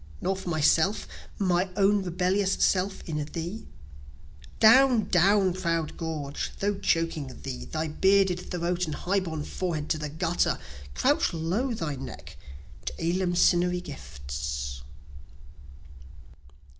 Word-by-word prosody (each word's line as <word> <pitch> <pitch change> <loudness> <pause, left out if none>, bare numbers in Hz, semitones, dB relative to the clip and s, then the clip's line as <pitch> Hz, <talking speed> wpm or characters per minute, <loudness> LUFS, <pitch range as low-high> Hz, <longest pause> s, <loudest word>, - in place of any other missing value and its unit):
Nor 190 - 0
for 190 -1 -6
myself 160 +5 +2 0.3
my 185 -1 +1
own 200 0 +3
rebellious 185 +2 +1
self 190 +1 +1
in 150 -2 -2
thee? 170 +8 -6 0.9
Down, 245 -1 +6
down, 190 +1 +4
proud 165 -4 -1
gorge! 155 -4 -4
though 200 0 0
choking 165 -6 0 0.2
thee; 130 -2 -5
Thy 160 0 -3
bearded 190 +2 +3
throat 175 0 -1
and 155 - -3
high 195 +2 0
borne 160 -5 -4
forehead 160 -3 -3
to 155 - 0
the 150 -1 -4
gutter; 165 +3 0 0.4
Crouch - - +2
low 200 +11 -1
thy 150 -8 -3
neck 135 - -9 0.5
to - - -2
eleemosynary 175 0 +2
gifts. 65 - -6
175 Hz, 120 wpm, -27 LUFS, 155-190 Hz, 0.9 s, Down